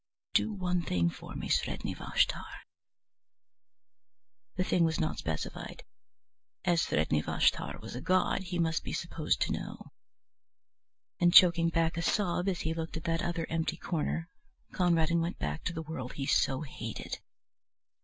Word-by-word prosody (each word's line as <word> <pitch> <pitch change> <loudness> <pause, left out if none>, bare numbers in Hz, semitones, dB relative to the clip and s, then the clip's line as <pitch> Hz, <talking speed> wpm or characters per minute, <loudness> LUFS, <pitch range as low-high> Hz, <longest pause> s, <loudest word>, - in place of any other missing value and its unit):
"Do - - +3
one 180 -3 0
thing 85 - +1
for - - -10
me, - - -4
Sredni - - 0
Vashtar." - - -1 1.9
The 185 - +1
thing 180 -1 +2
was 160 -1 +1
not 155 - -1
specified. 80 -2 -5 0.8
As 175 -2 +3
Sredni 75 0 +1
Vashtar - - +1
was - - -8
a 125 - -5
god 185 +1 +2
he 175 0 -3
must 165 -2 +1
be - - -5
supposed 165 -2 -1
to - - +1
know. - - -5 1.3
And 175 0 +5
choking 170 -2 +7
back 165 0 +1
a - - 0
sob 180 0 +1
as 180 - -2
he 160 - -1
looked 165 0 -4
at 160 - -7
that 165 0 0
other 170 -1 -1
empty 165 0 -1
corner, 165 0 -2 0.5
Conradin 170 -2 +3
went 170 +2 -2
back 75 0 -3
to 180 - -1
the 160 -1 -4
world 140 -5 -6
he 135 - -3
so 135 0 +2
hated. 115 -6 -6
165 Hz, 155 wpm, -31 LUFS, 155-175 Hz, 1.9 s, choking